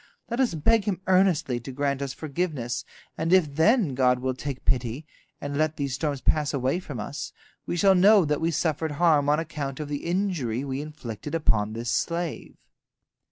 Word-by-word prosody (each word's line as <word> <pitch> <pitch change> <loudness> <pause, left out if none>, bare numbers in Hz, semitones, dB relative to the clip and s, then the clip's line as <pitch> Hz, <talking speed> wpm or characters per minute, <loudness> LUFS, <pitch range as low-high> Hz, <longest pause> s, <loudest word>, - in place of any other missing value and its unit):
Let 235 - -2
us 250 -10 +2
beg 210 +7 +2
him 200 -4 -1
earnestly 185 -9 +2
to 120 +3 -8
grant 140 +1 -1
us 140 -1 -2
forgiveness, 135 -5 -3 0.3
and 165 +1 0
if 175 -6 +4
then 180 - +3
God 125 -1 +3
will 130 +1 -2
take 135 0 -6
pity, 125 +3 0 0.3
and 145 0 -5
let 155 0 +1
these 140 -2 -2
storms 140 0 -2
pass 150 -2 +1
away 135 +5 0
from 145 -9 -7
us, 120 +7 -5 0.4
we 175 - -2
shall 195 +2 +5
know 195 0 +6
that 150 0 -1
we 165 - +1
suffered 160 -1 -1
harm 145 -2 +3
on 150 +1 +3
account 150 -4 -4
of 150 -1 -5
the 145 -1 -4
injury 170 - -1
we 135 0 -3
inflicted 150 -2 -6
upon 110 -9 +1
this 115 +1 -3
slave." 170 -2 -2
150 Hz, 185 wpm, -26 LUFS, 130-170 Hz, 0.4 s, know